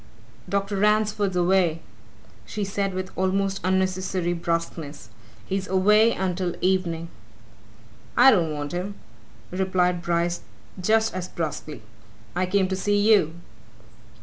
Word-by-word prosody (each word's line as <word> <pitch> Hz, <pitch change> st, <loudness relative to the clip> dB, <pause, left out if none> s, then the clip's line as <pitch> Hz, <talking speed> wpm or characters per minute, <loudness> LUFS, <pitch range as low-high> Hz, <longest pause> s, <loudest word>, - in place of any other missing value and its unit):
"Dr. 200 Hz, +1 st, -1 dB
Ransford 210 Hz, 0 st, +2 dB
is 185 Hz, -, -8 dB
away," 175 Hz, -2 st, +2 dB, 0.6 s
she 210 Hz, -, -4 dB
said 195 Hz, -1 st, -2 dB
with 185 Hz, 0 st, -4 dB
almost 195 Hz, +1 st, 0 dB
unnecessary 185 Hz, -1 st, 0 dB
brusqueness. 165 Hz, -3 st, -4 dB, 0.4 s
"He's 190 Hz, 0 st, -2 dB
away 210 Hz, +4 st, +4 dB
until 180 Hz, -2 st, -2 dB
evening." 175 Hz, -3 st, 0 dB, 1.1 s
"I 260 Hz, +2 st, +8 dB
don't 170 Hz, -8 st, +2 dB
want 145 Hz, -1 st, -4 dB
him," 185 Hz, +3 st, -4 dB, 0.6 s
replied 180 Hz, -1 st, +1 dB
Bryce 170 Hz, 0 st, 0 dB, 0.4 s
just 220 Hz, +3 st, +2 dB
as 185 Hz, -1 st, -4 dB
brusquely. 155 Hz, -7 st, -5 dB, 0.5 s
"I 185 Hz, +1 st, +1 dB
came 190 Hz, 0 st, +2 dB
to 190 Hz, -, 0 dB
see 205 Hz, +2 st, +1 dB
you." 205 Hz, -6 st, +4 dB
185 Hz, 120 wpm, -24 LUFS, 175-195 Hz, 1.1 s, I